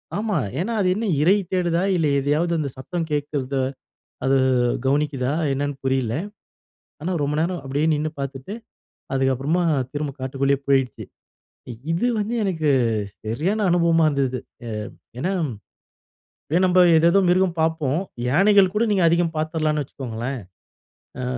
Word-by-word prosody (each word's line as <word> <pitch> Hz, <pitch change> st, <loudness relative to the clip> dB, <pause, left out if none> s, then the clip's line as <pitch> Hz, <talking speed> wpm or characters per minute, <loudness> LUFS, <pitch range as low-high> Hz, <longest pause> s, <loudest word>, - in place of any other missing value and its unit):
ஆமா. 210 Hz, -1 st, -1 dB, 0.2 s
ஏன்னா, 225 Hz, +7 st, -1 dB
அது 185 Hz, -, +2 dB
என்ன 225 Hz, +3 st, -2 dB, 0.2 s
இறை 185 Hz, +7 st, +5 dB, 0.2 s
தேடுதா? 175 Hz, -2 st, +1 dB
இல்ல 165 Hz, -3 st, +2 dB
எதையாவது 150 Hz, +5 st, +1 dB
அந்த 145 Hz, -2 st, -2 dB
சத்தம் 165 Hz, +5 st, -4 dB
கேக்கிறத 145 Hz, -2 st, -2 dB, 0.7 s
அது 135 Hz, +1 st, +4 dB, 0.5 s
கவனிக்குதா? 140 Hz, -1 st, +1 dB, 0.2 s
என்னான்னு 145 Hz, +1 st, -2 dB
புரியல! 130 Hz, -4 st, 0 dB, 0.9 s
ஆனா 185 Hz, +3 st, -1 dB
ரொம்ப 145 Hz, +1 st, -1 dB
நேரம், 175 Hz, +1 st, -1 dB
அப்டியே 140 Hz, +4 st, 0 dB
நின்னு 150 Hz, +1 st, -1 dB
பாத்துட்டு, 140 Hz, +7 st, -5 dB, 0.6 s
அதுக்கப்புறமா 135 Hz, +6 st, +1 dB, 0.3 s
திரும்ப 145 Hz, -1 st, -3 dB
காட்டுக்குள்ளயே 135 Hz, +1 st, 0 dB
போயிட்ச்சு. 135 Hz, -2 st, +1 dB, 0.9 s
இது 175 Hz, +9 st, +1 dB
வந்து 215 Hz, +3 st, -2 dB
எனக்கு 165 Hz, -6 st, 0 dB, 0.6 s
சரியான 175 Hz, -, -1 dB
அனுபவமா 170 Hz, -1 st, +3 dB
இருந்தது. 135 Hz, -3 st, 0 dB, 0.3 s
ஏ -, -, -5 dB, 0.5 s
ஏன்னா, 180 Hz, +9 st, -1 dB, 1.1 s
அப்டியே 170 Hz, +4 st, +1 dB
நம்ப 180 Hz, 0 st, +3 dB, 0.2 s
ஏதேதோ 170 Hz, +4 st, +5 dB
மிருகம் 180 Hz, -1 st, +2 dB
பாப்போம். 160 Hz, -2 st, +1 dB, 0.3 s
யானைகள் 195 Hz, +6 st, +5 dB
கூட 220 Hz, -, +2 dB
நீங்க 195 Hz, -3 st, +2 dB
அதிகம் 170 Hz, 0 st, +1 dB
பாத்துடலாம்ன்னு 155 Hz, -1 st, 0 dB
வச்சுக்கோங்களேன். 125 Hz, 0 st, -5 dB, 0.8 s
ஆ -, -, -3 dB
155 Hz, 125 wpm, -22 LUFS, 135-175 Hz, 1.1 s, இறை